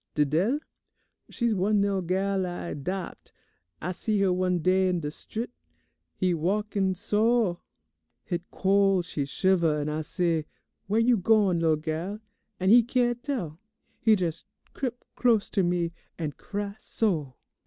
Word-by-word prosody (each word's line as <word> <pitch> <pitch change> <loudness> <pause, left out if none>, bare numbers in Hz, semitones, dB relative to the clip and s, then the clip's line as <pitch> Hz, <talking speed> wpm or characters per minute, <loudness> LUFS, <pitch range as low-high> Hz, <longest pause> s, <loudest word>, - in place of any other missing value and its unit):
Didele? 165 - +2 0.7
She's 235 -2 0
one 205 +2 +2
lil' 200 -1 +1
gal 190 +1 0
I 175 -1 -5
'dopt. 180 +6 -5 0.5
I 180 - -3
see 210 +3 -1
her 190 -2 +3
one 180 0 +1
day 185 +2 +3
in 180 -1 0
de 150 -1 -3
strit. 230 +9 -6 0.6
He 185 -1 +1
walk 200 +7 -1 0.2
so; 210 -2 +1 0.6
hit 175 -3 -3
col' 195 -1 +3
she 150 -4 -3
shiver, 170 0 +2
an' 145 +1 -2
I 155 +1 -2
say, 165 -1 -1 0.4
'Where 210 +3 +2
you 235 +1 +4
gone, 195 -3 +3
lil' 160 -1 +3
gal?' 160 +7 -4 0.4
and 190 +2 +3
he 240 +2 +9
can' 240 0 +1
tell. 230 - -4 0.4
He 220 - +4
jes' 170 -4 -2 0.3
crip 245 -2 -4
close 230 -4 +2
to 195 - +2
me, 175 -1 0 0.2
an' 155 -3 -2
cry 205 +6 -5
so! 160 - -1
185 Hz, 145 wpm, -27 LUFS, 170-210 Hz, 0.7 s, he